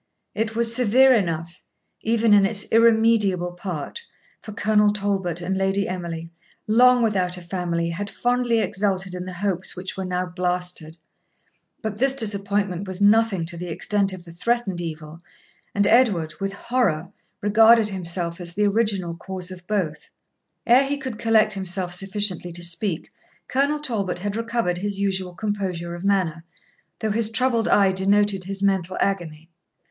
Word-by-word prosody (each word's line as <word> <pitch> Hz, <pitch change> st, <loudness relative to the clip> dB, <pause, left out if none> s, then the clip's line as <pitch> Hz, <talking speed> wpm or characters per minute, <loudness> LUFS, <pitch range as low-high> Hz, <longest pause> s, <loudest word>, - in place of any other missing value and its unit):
It 220 Hz, 0 st, -2 dB
was 230 Hz, 0 st, +3 dB
severe 255 Hz, +2 st, +5 dB
enough, 170 Hz, -5 st, -2 dB, 0.4 s
even 225 Hz, -1 st, +2 dB
in 205 Hz, -1 st, +6 dB
its 205 Hz, +1 st, +1 dB
irremediable 220 Hz, -5 st, +3 dB
part; 175 Hz, -, -6 dB, 0.4 s
for 215 Hz, -, -9 dB
Colonel 210 Hz, -1 st, +2 dB
Talbot 195 Hz, -4 st, -2 dB
and 185 Hz, +2 st, -2 dB
Lady 195 Hz, +1 st, 0 dB
Emily, 170 Hz, -2 st, -5 dB, 0.3 s
long 245 Hz, +2 st, +5 dB
without 185 Hz, -5 st, 0 dB
a -, -, -8 dB
family, 170 Hz, -2 st, -2 dB
had 200 Hz, +4 st, -4 dB
fondly 245 Hz, 0 st, +1 dB
exulted 190 Hz, -3 st, -1 dB
in 180 Hz, 0 st, -5 dB
the 185 Hz, -, -7 dB
hopes 185 Hz, 0 st, -1 dB
which 185 Hz, +1 st, -5 dB
were 190 Hz, -, -4 dB
now 180 Hz, 0 st, -2 dB
blasted. 180 Hz, -2 st, -3 dB, 0.9 s
But 215 Hz, -1 st, -4 dB
this 270 Hz, +1 st, +3 dB
disappointment 200 Hz, -4 st, -1 dB
was 185 Hz, 0 st, -5 dB
nothing 205 Hz, -3 st, +3 dB
to 170 Hz, +1 st, -3 dB
the 180 Hz, +1 st, -6 dB
extent 200 Hz, +4 st, 0 dB
of 185 Hz, -2 st, -9 dB
the 170 Hz, -, -11 dB
threatened 195 Hz, 0 st, -1 dB
evil; 155 Hz, -1 st, -7 dB, 0.6 s
and 200 Hz, 0 st, +3 dB
Edward, 195 Hz, -10 st, +3 dB
with 195 Hz, 0 st, -3 dB
horror, 200 Hz, -7 st, -1 dB, 0.3 s
regarded 220 Hz, +1 st, +5 dB
himself 175 Hz, -2 st, -3 dB
as 170 Hz, -1 st, -7 dB
the 210 Hz, +1 st, +2 dB
original 200 Hz, -5 st, 0 dB
cause 185 Hz, +1 st, -6 dB
of 180 Hz, -1 st, -11 dB
both. 165 Hz, -8 st, -2 dB, 0.6 s
Ere 245 Hz, +3 st, +6 dB
he 285 Hz, +1 st, -1 dB
could 260 Hz, -6 st, -6 dB
collect 220 Hz, -2 st, +3 dB
himself 185 Hz, -2 st, -2 dB
sufficiently 195 Hz, -2 st, 0 dB
to 175 Hz, 0 st, -4 dB
speak, 170 Hz, 0 st, -2 dB, 0.4 s
Colonel 280 Hz, +3 st, +1 dB
Talbot 220 Hz, -10 st, -2 dB
had 200 Hz, +3 st, -4 dB
recovered 230 Hz, -6 st, -1 dB
his 200 Hz, 0 st, -3 dB
usual 190 Hz, -2 st, -1 dB
composure 185 Hz, -5 st, -3 dB
of 175 Hz, +1 st, -7 dB
manner, 185 Hz, -5 st, 0 dB, 0.6 s
though 220 Hz, -1 st, 0 dB
his 220 Hz, +1 st, 0 dB
troubled 230 Hz, 0 st, +1 dB
eye 195 Hz, -2 st, +4 dB
denoted 195 Hz, 0 st, +1 dB
his 195 Hz, +1 st, -2 dB
mental 190 Hz, -2 st, 0 dB
agony. 165 Hz, -5 st, -2 dB
195 Hz, 155 wpm, -23 LUFS, 180-220 Hz, 0.9 s, in